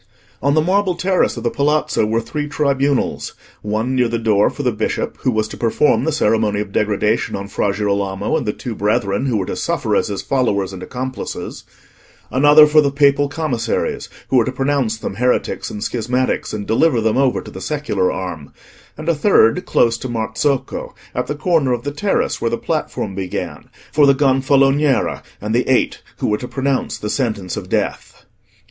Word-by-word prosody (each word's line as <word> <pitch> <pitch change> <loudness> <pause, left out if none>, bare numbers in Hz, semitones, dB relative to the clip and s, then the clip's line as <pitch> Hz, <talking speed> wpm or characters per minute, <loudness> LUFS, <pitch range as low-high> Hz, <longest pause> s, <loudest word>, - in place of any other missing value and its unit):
On 140 +2 +2
the 155 - +4
marble 190 +1 +1
terrace 185 -5 +1
of 115 - -5
the 120 - 0
Palazzo 150 -6 +1
were 115 +1 +1
three 150 +5 -4
tribunals; 140 -2 0 0.3
one 110 +4 -1
near 125 -2 +2
the 115 0 -1
door 110 -3 +3
for 145 - -6
the 125 - +2
Bishop, 110 -1 -2
who - - 0
was 110 -3 0
to - - -8
perform 120 +5 +2
the 160 - +1
ceremony 110 -7 +1
of 105 -1 -4
degradation 105 +2 0
on 100 0 -5
Fra 100 0 0
Girolamo 100 -1 -1
and 120 - -1
the - - +2
two 120 +2 -6
brethren 105 +3 0
who 120 -4 +1
were 95 - -1
to - - -4
suffer - - -1
as - - +1
his 100 -2 -4
followers 100 -8 0
and 95 - -8
accomplices; 130 +3 -6 0.7
another 145 +3 +7
for 150 0 +5
the 140 - +2
Papal 140 0 +3
Commissaries, 140 -8 -2 0.2
who 130 - +3
were 120 - +5
to 130 - -2
pronounce 135 -4 0
them 110 - -5
heretics 125 +2 0
and 105 - -6
schismatics, 125 +2 -1
and 105 -1 -4
deliver 120 +4 +2
them 110 -1 +1
over 135 -2 +2
to - - -10
the - - -9
secular 140 -12 -1
arm; 85 -6 -6 0.5
and 155 +1 -7
a 170 - +4
third, 145 - +3
close 115 -1 +2
to 130 - -5
Marzocco, 120 +4 -2 0.2
at - - -2
the 150 - -2
corner 150 -5 +1
of 120 - -3
the 145 - -3
terrace 195 +7 -1
where - - +1
the - - -1
platform 100 - -3
began, 95 -1 -5 0.2
for 145 -2 +4
the 140 - +5
Gonfaloniere, 135 +1 +2 0.2
and 105 +2 -3
the 120 +2 +1
Eight 130 - +1 0.2
who - - -3
were 105 - 0
to 125 - -6
pronounce 135 0 -1
the 105 - -4
sentence 110 -9 -2
of - - -6
death. - - -3
125 Hz, 190 wpm, -19 LUFS, 105-140 Hz, 0.7 s, another